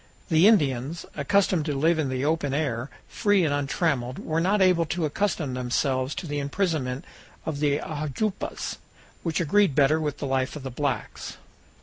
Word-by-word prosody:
The 165 +3 +6
Indians, 145 - +2
accustomed 180 +1 +2
to 150 -3 -1
live 160 +4 +2
in 145 -4 0
the 130 +1 -1
open 150 -3 0
air, 135 -4 -1 0.2
free 205 -5 +2
and 145 - +1
untrammeled, 140 -3 0
were 160 +1 -1
not 195 +4 +2
able 180 -3 +4
to 170 0 -1
accustom 155 -3 -1
themselves 130 +2 0
to - - -5
the 145 -2 -2
imprisonment 140 -4 -1 0.4
of 150 -3 -3
the 145 -1 +2
ajoupas, 155 +8 -3 0.4
which 165 -2 -1
agreed 180 -1 +3
better 150 +2 +4
with 150 -2 -2
the - - -4
life 130 0 0
of 150 - -7
the 135 - -5
blacks. 140 +1 -3
150 Hz, 165 wpm, -26 LUFS, 135-170 Hz, 0.4 s, The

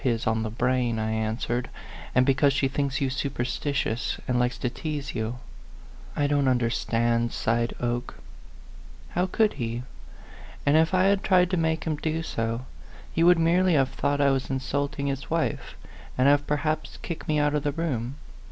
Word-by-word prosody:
115 125 -4 +3
his 115 - -5
on 110 - -1
the 110 - -2
brain," 120 +1 0
I 110 0 -1
answered; 110 +2 -2 0.2
" - - -14
and 125 +1 +5
be 135 - +4
cause 140 +1 +3
she 140 0 +2
thinks 140 0 -1
you 135 -1 +1
superstitious, 130 -2 -2
and 125 -1 +1
likes 125 0 0
to 125 - -1
tease 150 -1 -4
you." 115 +1 -3 0.4
" - - -19
I 145 - +1
don't 145 -1 +2
understand," 115 -1 +1
sighed 115 +1 0
Oke. 120 0 -2 0.9
How 180 - 0
could 215 +3 +2
he? 115 +1 -3 0.8
And 145 +1 +4
if 160 +3 +4
I 185 - +4
had 195 0 +3
tried 180 -1 +4
to - - +2
make 160 -1 0
him 155 -2 -1
do 160 +1 -2
so, 115 -3 -2 0.5
he 165 - +2
would 175 0 +7
merely 175 +2 +3
have 135 -2 +3
thought 140 +1 -1
I 140 -1 +4
was 135 -1 -1
insulting 140 +2 -2
his 140 -1 -3
wife, 165 0 -1 0.4
and 130 +1 +4
have 145 0 +4
perhaps 155 +1 -1
kicked 170 -1 -6
me 155 -2 +1
out 145 0 +2
of 150 - +1
the 145 0 0
room. 140 -5 -2
140 Hz, 190 wpm, -26 LUFS, 120-155 Hz, 0.9 s, would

